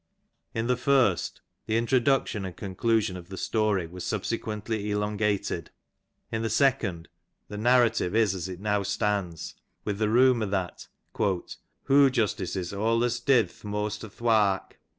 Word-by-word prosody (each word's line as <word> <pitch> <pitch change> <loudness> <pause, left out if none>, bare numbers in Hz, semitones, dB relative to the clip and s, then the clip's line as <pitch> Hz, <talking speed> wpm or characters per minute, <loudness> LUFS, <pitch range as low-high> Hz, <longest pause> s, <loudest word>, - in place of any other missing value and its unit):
In 115 0 -1
the 125 +1 +2
first 125 -8 +2 0.3
the 110 - +1
introduction 120 -2 +1
and 95 -2 -6
conclusion 105 0 0
of 90 0 -10
the 95 - -7
story 105 -5 0
were 90 +3 -10
sub 100 +2 -3
sequently 110 -2 -3
elongated; 105 -4 -1 0.6
in 115 - -2
the 115 - -1
second 110 -13 +1 0.4
the 105 - -6
narrative 120 -4 +3
is 110 -4 +3
as 95 -1 -4
it 90 -1 -7
now 105 0 0
stands, 100 -4 -2 0.3
with 105 -1 -2
the 105 -1 +1
rumour 120 -1 +4
that 95 -3 -3 0.3
^' 95 -4 -1 0.3
hoo 140 0 +5
justices 100 -7 -1
awlus 115 +4 0
did 120 -9 +4
th - - -21
moast 105 0 -3
o^th^ 110 - -11
wark. 105 -5 +2
105 Hz, 150 wpm, -27 LUFS, 95-115 Hz, 0.6 s, hoo